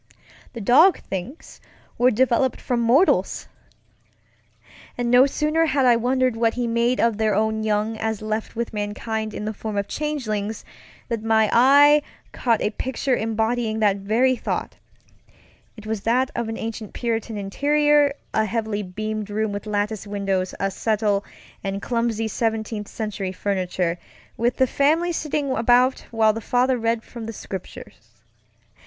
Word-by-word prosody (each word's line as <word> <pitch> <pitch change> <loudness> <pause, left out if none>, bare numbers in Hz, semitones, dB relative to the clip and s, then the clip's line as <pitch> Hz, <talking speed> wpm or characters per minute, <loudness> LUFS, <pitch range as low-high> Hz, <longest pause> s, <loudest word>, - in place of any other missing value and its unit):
The 235 - -6
dog 300 - +6
things 195 - -7 0.4
were 245 +1 +5
developed 255 +2 +1
from 245 -2 -1
mortals! 245 +10 +2 1.5
And 240 -1 -1
no 250 +2 +7
sooner 305 +3 +1
had 275 -3 +2
I 245 -1 +6
wondered 255 +1 +1
what 225 0 +1
he 245 -1 -1
made 235 +2 +1
of 230 -2 +2
their 215 -2 +2
own 220 +1 0
young 215 +1 0
as 220 -1 -2
left 215 +1 -4
with 235 0 -3
mankind 215 +1 -3
in 210 - -6
the 215 - -3
form 215 0 -5
of 200 0 -1
changelings, 225 -9 -3 0.4
than 225 -2 -3
my 220 -1 +3
eye 285 +4 +6 0.3
caught 230 -3 0
a 210 - 0
picture 260 +2 -1
embodying 225 0 -1
that 205 -2 +2
very 230 +6 +2
thought. - - -4 1.0
It 215 - -11
was 215 -2 -3
that 255 +5 +1
of 235 -1 -2
an 225 - -4
ancient 225 -2 -6
Puritan 230 -2 -2
interiorŌĆöa 290 +8 +2 0.4
heavily 220 -1 -2
beamed 215 +2 -4
room 215 0 -1
with 205 +1 -6
lattice 210 0 -2
windows, 195 -2 -2
a 195 0 0
settle, 210 -1 0 0.4
and 195 0 -3
clumsy 230 0 -1
Seventeenth 220 -1 -2
Century 205 -4 -4
furniture, 185 -3 -2 0.4
with 240 +2 0
the 260 - +4
family 315 +7 +2
sitting 300 -4 -2
about 250 +1 +3
while 220 -2 +3
the 225 - -5
father 250 +3 +2
read 230 0 0
from 230 -2 -9
the 225 - -5
Scriptures. 190 -3 -10
225 Hz, 150 wpm, -23 LUFS, 210-250 Hz, 1.5 s, no